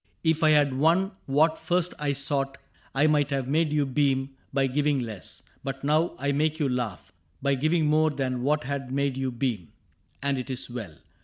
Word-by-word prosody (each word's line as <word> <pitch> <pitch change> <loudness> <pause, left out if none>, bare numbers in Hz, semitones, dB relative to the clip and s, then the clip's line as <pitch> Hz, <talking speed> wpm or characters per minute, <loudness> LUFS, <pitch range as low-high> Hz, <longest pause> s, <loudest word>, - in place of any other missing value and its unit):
If 160 -1 +2
I 155 - +5
had 145 -3 +4
won 175 +6 +3 0.2
What 155 +4 +3
first 180 0 0
I 145 -1 0
sought, 135 0 -1 0.4
I 140 +3 +4
might 150 -2 +3
have 135 -3 -1
made 155 +2 +2
you 150 -1 +2
beam 135 0 +1 0.2
By 135 0 +2
giving 145 +1 +1
less; 110 -8 -5 0.2
but 135 0 -5
now 155 +4 +2
I 140 +1 0
make 155 +2 +1
you 150 -3 +1
laugh 120 -8 -3 0.3
By 140 0 +1
giving 155 +4 +2
more 155 +1 +4
than 130 -4 -2
what 150 +4 +1
had 135 -1 -4
made 140 -1 0
you 130 -1 -2
beam, 115 - -3 0.5
And 140 -1 0
it 125 - -6
is 130 -1 -3
well. 110 -10 -6
140 Hz, 190 wpm, -27 LUFS, 130-150 Hz, 0.5 s, I